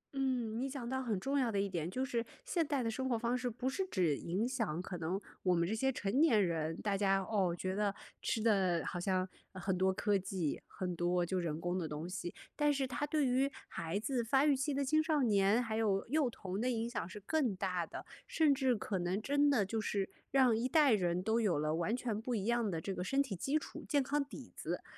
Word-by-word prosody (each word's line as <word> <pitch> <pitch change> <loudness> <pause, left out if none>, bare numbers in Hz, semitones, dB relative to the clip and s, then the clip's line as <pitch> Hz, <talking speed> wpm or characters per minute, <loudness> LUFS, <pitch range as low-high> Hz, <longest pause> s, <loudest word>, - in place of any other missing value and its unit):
嗯， 250 -4 0
你 270 +1 -1
讲 260 -3 -5
到 265 +1 -1
很 225 -7 -1
重 275 +6 0
要 245 -4 +1
的 200 - 0
一 200 - +1
点， 170 -4 -3
就 255 +8 -1
是 235 -4 -1 0.2
现 355 -10 +1
代 280 -5 0
的 230 - 0
生 260 +3 -2
活 235 - +2
方 235 +2 0
式 250 0 -1
不 245 +3 -4
是 375 +9 0
只 175 - +2
影 190 - -1
响 225 - -1
可 180 -1 -5
能 175 +4 -1 0.2
我 180 -1 +3
们 170 0 +2
这 215 - -1
些 265 +4 +1
成 245 +3 0
年 225 -11 +5
人， 160 -1 -2
大 205 -2 +1
家， 195 -1 +3
哦， 190 -5 +1
觉 185 +2 -2
得 205 -1 +1 0.3
吃 - - 0
的 190 -6 +3
好 175 - -3
像， 185 0 0 0.3
嗯， 185 - -7
很 190 0 0
多 190 +1 +3
科 205 +2 +1
技， 185 -5 -1
很 180 -2 -4
多 175 +1 +1
就 185 +2 -1
人 165 -3 -2
工 175 +2 -1
的 165 - -2
东 150 +3 -5
西。 180 -1 -4 0.2
但 295 0 +3
是 275 -1 0
它 255 +3 -2
对 300 -1 +1
于 265 +2 +2 0.2
孩 165 +5 -3
子、 245 +1 -1
发 270 +5 +3
育 290 - +5
期 270 +3 -1
的 280 0 0
青 310 +4 +3
少 310 -4 +2
年、 205 +1 +4
还 220 -2 -2
有 200 -3 +1
幼 290 0 +2
童 195 -2 -5
的 255 - +1
影 230 -1 -1
响 205 -7 -4
是 210 - -8
更 250 0 0
大 185 -3 -1
的， - - -8 0.2
甚 310 -3 +4
至 265 -2 +2
可 200 -3 -2
能 180 +3 0
真 285 +4 +3
的 240 -8 +3
就 220 +3 -2
是 200 -2 -1 0.2
让 260 -4 +4
一 230 +3 0
代 295 -4 +5
人 180 -3 +1
都 225 +2 +2
有 190 -9 +2
了 155 +1 0
完 190 +9 0
全 225 -4 -2
不 245 0 -2
一 200 -1 -2
样 235 -2 +1
的 165 - -2
这 195 +4 -3
个 180 - -3
身 275 +8 +2
体 215 -8 -5
基 275 - 0
础、 - - -7
健 285 -3 +3
康 285 +2 0
底 280 - -11
子。 - - -4
220 Hz, 265 characters per minute, -35 LUFS, 185-260 Hz, 0.3 s, 年